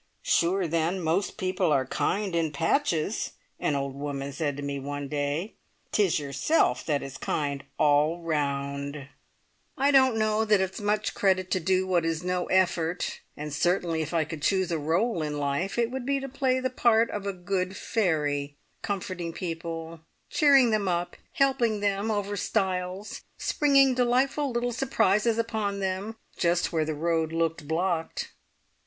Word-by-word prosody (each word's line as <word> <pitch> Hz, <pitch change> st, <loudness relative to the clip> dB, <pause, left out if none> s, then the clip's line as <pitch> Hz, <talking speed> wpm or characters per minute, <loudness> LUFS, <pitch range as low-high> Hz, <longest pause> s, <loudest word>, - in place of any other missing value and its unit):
"Sure 180 Hz, +2 st, +2 dB
then, 165 Hz, +3 st, 0 dB
most 175 Hz, +4 st, 0 dB
people 185 Hz, -3 st, 0 dB
are 135 Hz, -3 st, +3 dB
kind 190 Hz, +7 st, -1 dB
in 165 Hz, -2 st, +1 dB
patches," 165 Hz, -, 0 dB, 0.3 s
an 145 Hz, -, 0 dB
old 140 Hz, -1 st, -2 dB
woman 140 Hz, 0 st, -4 dB
said 145 Hz, -1 st, -2 dB
to 145 Hz, -, -5 dB
me 140 Hz, 0 st, -3 dB
one 145 Hz, +1 st, -5 dB
day; 150 Hz, +7 st, -2 dB, 0.4 s
"'tis 200 Hz, -5 st, +2 dB
yourself 145 Hz, -, +1 dB
that 145 Hz, -3 st, 0 dB
is 135 Hz, -1 st, -7 dB
kind 140 Hz, -2 st, -2 dB
all 150 Hz, +3 st, +3 dB
round!" 140 Hz, -2 st, -2 dB, 0.7 s
I 280 Hz, +1 st, +3 dB
don't 260 Hz, -4 st, +5 dB
know 215 Hz, 0 st, +2 dB
that 210 Hz, -2 st, +3 dB
it's 190 Hz, +2 st, -2 dB
much 210 Hz, +1 st, 0 dB
credit 185 Hz, -2 st, +1 dB
to 185 Hz, -, +2 dB
do 185 Hz, +2 st, +1 dB
what 180 Hz, -3 st, +2 dB
is 165 Hz, 0 st, -1 dB
no 180 Hz, 0 st, -1 dB
effort, 180 Hz, -2 st, +1 dB, 0.2 s
and 150 Hz, 0 st, -5 dB
certainly 170 Hz, +1 st, +1 dB
if 155 Hz, -, -4 dB
I 165 Hz, -2 st, +2 dB
could 155 Hz, 0 st, -7 dB
choose 190 Hz, +1 st, +1 dB
a 165 Hz, -, 0 dB
role 170 Hz, +6 st, 0 dB
in 150 Hz, -1 st, -2 dB
life 145 Hz, +8 st, -1 dB
it 235 Hz, 0 st, +1 dB
would 260 Hz, -1 st, -4 dB
be 280 Hz, 0 st, +1 dB
to 270 Hz, -, -5 dB
play 260 Hz, -1 st, 0 dB
the 260 Hz, 0 st, -2 dB
part 235 Hz, -2 st, +3 dB
of 200 Hz, -1 st, -4 dB
a -, -, +1 dB
good 185 Hz, +1 st, -2 dB
fairy, 145 Hz, -8 st, 0 dB, 0.3 s
comforting 185 Hz, -4 st, -3 dB
people, 165 Hz, -1 st, -5 dB, 0.3 s
cheering 275 Hz, -5 st, +5 dB
them 210 Hz, -2 st, +1 dB
up, 175 Hz, -1 st, -1 dB, 0.2 s
helping 255 Hz, -6 st, +2 dB
them 200 Hz, +1 st, 0 dB
over 205 Hz, -1 st, -1 dB
stiles, 190 Hz, 0 st, -2 dB, 0.2 s
springing 275 Hz, -3 st, +4 dB
delightful 255 Hz, +4 st, +2 dB
little 240 Hz, 0 st, -1 dB
surprises 230 Hz, -3 st, +2 dB
upon 220 Hz, -3 st, -1 dB
them, 195 Hz, +3 st, -2 dB, 0.2 s
just 175 Hz, 0 st, +1 dB
where 160 Hz, -1 st, +1 dB
the 155 Hz, 0 st, -2 dB
road 160 Hz, 0 st, 0 dB
looked 165 Hz, -2 st, -1 dB
blocked! 165 Hz, 0 st, -1 dB
180 Hz, 160 wpm, -27 LUFS, 155-215 Hz, 0.7 s, don't